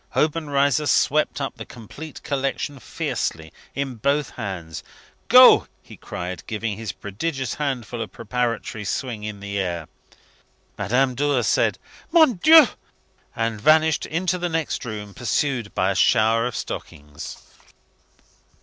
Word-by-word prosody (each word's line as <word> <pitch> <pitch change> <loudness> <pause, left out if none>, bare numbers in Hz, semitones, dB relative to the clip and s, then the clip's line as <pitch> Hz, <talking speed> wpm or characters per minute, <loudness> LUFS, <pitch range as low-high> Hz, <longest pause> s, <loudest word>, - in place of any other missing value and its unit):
Obenreizer 145 -2 +1
swept 150 +1 +2
up 135 - -4
the - - -6
complete 140 +7 -11
collection 140 0 -2
fiercely 80 -8 -4 0.2
in 135 -3 -3
both 140 +4 0
hands. 90 - -6 0.4
"Go!" - - +8 0.2
he - - -13
cried, 90 -1 -6
giving 110 -1 -3
his 110 0 -5
prodigious 130 +6 -4
handful 125 -5 -3
a 110 - -3
preparatory 115 -1 -3
swing 110 +1 -3
in 105 -1 -6
the 100 0 -3
air. 85 -4 -3 0.9
Madame 125 +6 +1
Dor 140 -1 +1
said, - - +2 0.3
"Mon 315 -6 +6
Dieu," 320 -2 +9 0.7
and 115 -2 -2
vanished 155 +2 +4
into 180 +2 -1
the 175 0 -1
next 160 -4 -2
room, 105 -3 -6
pursued 120 0 -1
by 95 +1 +2
a - - -2
shower 115 +4 +3
of 125 - -6
stockings. 75 +1 -7
120 Hz, 130 wpm, -23 LUFS, 105-145 Hz, 0.9 s, Dieu